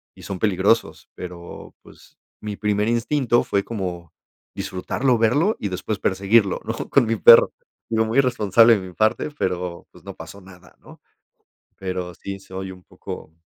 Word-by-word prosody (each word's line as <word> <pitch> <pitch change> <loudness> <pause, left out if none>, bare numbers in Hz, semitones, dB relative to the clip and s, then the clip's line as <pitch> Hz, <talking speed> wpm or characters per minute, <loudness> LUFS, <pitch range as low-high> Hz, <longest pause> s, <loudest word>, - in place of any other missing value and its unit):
y - - -15
son 95 - -5
peligrosos, 105 +3 +1
pero, 85 -1 -9
pues, - - -19 0.2
mi 105 -1 -5
primer 105 0 0
instinto 120 +1 +1
fue 100 - -1
como 90 -7 -6 0.4
disfrutarlo, 125 +7 -1
verlo 145 - +2
y 105 - -3
después 95 +3 -4
perseguirlo 100 +1 +2
¿no?, - - -3
con 140 - +4
mi 115 - +1
perro. 115 - +8 0.4
Digo 110 0 +1
muy 115 +5 +1
irresponsable 115 -3 +4
de 95 -2 -7
mi 90 - -12
parte 110 - +1
pero 90 -1 -3
pues - - -18
no - - -8
pasó 100 - -11
nada 90 -1 -17
¿no? - - -17 0.8
Pero 90 -2 -5
sí 100 +3 -7
soy 95 0 -7
un 90 - -15
poco 80 - -10
100 Hz, 160 wpm, -22 LUFS, 90-115 Hz, 0.8 s, perro